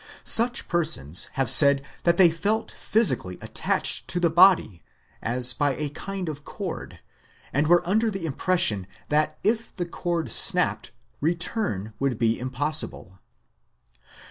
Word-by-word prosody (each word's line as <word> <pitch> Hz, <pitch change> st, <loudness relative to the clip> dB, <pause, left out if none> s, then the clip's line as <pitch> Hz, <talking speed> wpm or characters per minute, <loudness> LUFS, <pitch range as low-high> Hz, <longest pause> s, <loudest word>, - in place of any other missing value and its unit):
Such 240 Hz, +2 st, +3 dB
persons 155 Hz, -, 0 dB
have 135 Hz, -2 st, -2 dB
said 140 Hz, +2 st, +8 dB, 0.2 s
that 170 Hz, 0 st, +2 dB
they 175 Hz, -3 st, +5 dB
felt 205 Hz, +7 st, -3 dB
physically 130 Hz, -, 0 dB
attached -, -, -2 dB
to 175 Hz, -, -2 dB
the 170 Hz, -2 st, 0 dB
body, 170 Hz, -, +3 dB, 0.4 s
as 125 Hz, +1 st, 0 dB
by 145 Hz, -3 st, -2 dB
a 150 Hz, -1 st, -5 dB
kind 190 Hz, +5 st, -8 dB
of 145 Hz, -2 st, -8 dB
cord, -, -, -9 dB, 0.5 s
and 145 Hz, +3 st, 0 dB
were 175 Hz, +1 st, +2 dB
under 220 Hz, +4 st, 0 dB
the 195 Hz, -5 st, -6 dB
impression 135 Hz, -, 0 dB, 0.2 s
that 150 Hz, +1 st, -1 dB
if 225 Hz, +3 st, -2 dB
the 175 Hz, -, -4 dB
cord 170 Hz, -1 st, -5 dB
snapped 180 Hz, -2 st, +1 dB, 0.3 s
return 160 Hz, -, -3 dB
would 135 Hz, -4 st, -2 dB
be 115 Hz, 0 st, -1 dB
impossible. 130 Hz, -7 st, -2 dB
160 Hz, 135 wpm, -23 LUFS, 130-180 Hz, 0.5 s, said